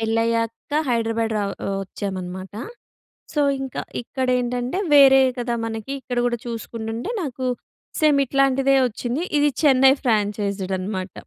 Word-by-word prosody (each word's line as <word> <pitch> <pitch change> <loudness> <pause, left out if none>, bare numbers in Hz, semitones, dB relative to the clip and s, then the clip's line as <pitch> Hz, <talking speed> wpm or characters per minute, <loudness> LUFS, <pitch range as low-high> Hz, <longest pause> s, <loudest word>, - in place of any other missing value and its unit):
పెళ్లయ్యాక 230 +3 -1 0.2
హైడ్రాబాద్ 225 -1 0
రా 205 - 0 0.2
ఒ - - -2
వచ్చామనమాట. 190 -1 -6 0.8
సో, 295 - +2 0.2
ఇంక 265 -1 -6 0.3
ఇక్కడేంటంటే 250 +3 -1 0.2
వేరే 270 -2 +8 0.2
కదా! 240 -1 -1
మనకి 225 +4 -5
ఇక్కడ 245 -2 -4
గూడా 240 -1 -1
చూసుకుంటుంటే, 230 - -5
నాకు 260 -3 -4 0.6
సేమ్ 300 -2 +4
ఇట్లాంటిదే 275 0 +3
వచ్చింది. 240 +6 -3 0.2
ఇది 295 0 +3
చెన్నై 270 -2 +6
ఫ్రాంచైజ్డ్ 205 -4 0
అనమాట. 185 -1 -4
235 Hz, 115 wpm, -22 LUFS, 220-265 Hz, 0.8 s, వేరే